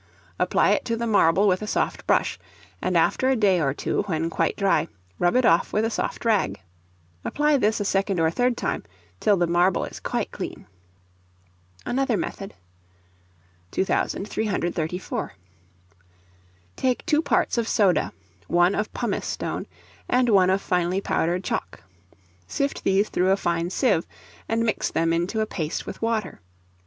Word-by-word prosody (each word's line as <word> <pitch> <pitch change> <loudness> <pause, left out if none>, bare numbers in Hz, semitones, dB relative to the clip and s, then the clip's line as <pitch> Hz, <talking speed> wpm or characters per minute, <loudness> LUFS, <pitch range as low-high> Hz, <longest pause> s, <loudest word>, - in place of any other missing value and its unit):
Apply - - +3
it - - +1
to 230 -1 -1
the 235 - -2
marble 200 -2 +4
with 185 0 +2
a 215 - -4
soft - - -1
brush, - - +1 0.4
and - - +1
after 260 - +2
a 265 - +3
day 195 -6 +3
or 140 -3 +1
two, 135 - -1
when 165 -2 -1
quite 165 0 0
dry, 190 -5 +2 0.3
rub 175 +5 +2
it 255 -1 +4
off 165 -3 +3
with 215 +1 +1
a 225 - -1
soft - - -3
rag. 215 -4 +1 0.6
Apply 295 0 +2
this 215 -3 +1
a 205 - -2
second 195 -1 0
or 160 0 +3
third 245 +5 +1
time - - -2 0.4
till 205 -2 +3
the 175 - +2
marble 175 +2 +2
is - - -9
quite - - -2
clean. - - -7 1.2
Another 255 -2 0
method. 195 +3 -5 1.1
2334. 185 - -2 1.4
Take 255 -1 -1
two 310 -3 +3
parts 285 - +1
of 230 - -1
soda, 200 -6 +2 0.4
one 175 +3 +3
of 210 +1 -2
pumice 235 -5 -2
stone, - - -4 0.4
and 250 -1 +3
one 190 -4 +5
of 190 +1 +1
finely 180 +1 +1
powdered 180 -1 0
chalk. - - -4 0.6
Sift 280 - -2
these 195 +2 +2
through 185 +1 +1
a 195 - +4
fine 170 -2 -1
sieve, 200 - +1 0.4
and 230 0 +1
mix 225 -2 0
them 165 0 +1
into 175 +6 0
a - - +1
paste 165 -7 -4
with - - -8
water. 225 -4 -2
195 Hz, 155 wpm, -24 LUFS, 175-225 Hz, 1.4 s, one